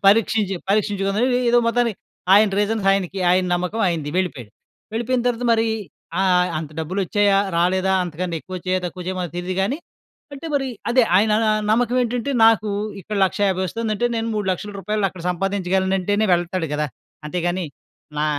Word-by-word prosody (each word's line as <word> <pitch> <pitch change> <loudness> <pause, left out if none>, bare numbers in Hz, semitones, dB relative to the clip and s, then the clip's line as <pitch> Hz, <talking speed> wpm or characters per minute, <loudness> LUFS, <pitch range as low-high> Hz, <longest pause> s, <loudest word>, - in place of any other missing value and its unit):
పరీక్షించి 205 -1 +3
పరీక్షించుకుని 200 0 +1 0.3
ఏదో 240 - +5
మొత్తానికి, 230 -2 +1 0.4
ఆయన 210 +1 +7
రీజన్స్ 210 -1 0
ఆయనకి, 195 -1 -1
ఆయన 185 +1 +3
నమ్మకం 180 +5 -2
ఆయనది, 160 -4 -1
వెళ్ళిపోయాడు. 155 - -2 0.4
వెళ్ళిపోయిన 240 +2 0
తర్వాత 245 0 0
మరి 225 0 +2 0.5
ఆహ్, 180 -1 +3
అంత 155 -2 -6
డబ్బులోచ్చాయా, 195 +4 +1 0.2
రాలేదా? 185 +2 +2
అంతకంటే 175 +1 -4
ఎక్కువొచ్చాయా? 185 0 -3
తక్కువొచ్చాయా? 180 +1 -4
మనకి 175 -1 -5
తెలీదు 180 +1 -3
గానీ, 260 +10 -1 0.6
అంటే 280 +4 -8
మరి 270 -2 0 0.2
అదే 250 +1 +5
ఆయన 210 +2 +3
న - - +2 0.2
నమ్మకం 245 +2 +2
ఏంటంటే, 245 +3 -2
నాకు 220 -2 +4 0.3
ఇక్కడ 210 +2 -5
1,50,000 190 -1 0
వస్తుందంటే 230 +3 -1
నేను 225 0 -2
3,00,000 205 0 -2
రూపాయలు 205 +1 0
అక్కడ 175 -3 -11
సంపాదించగలనంటేనే 190 +2 0
వెళ్తాడు 175 -1 -2
గదా! 150 0 -1 0.4
అంతేగాని 175 +1 -1 0.5
నా - - +2
195 Hz, 145 wpm, -21 LUFS, 180-220 Hz, 0.6 s, ఆయన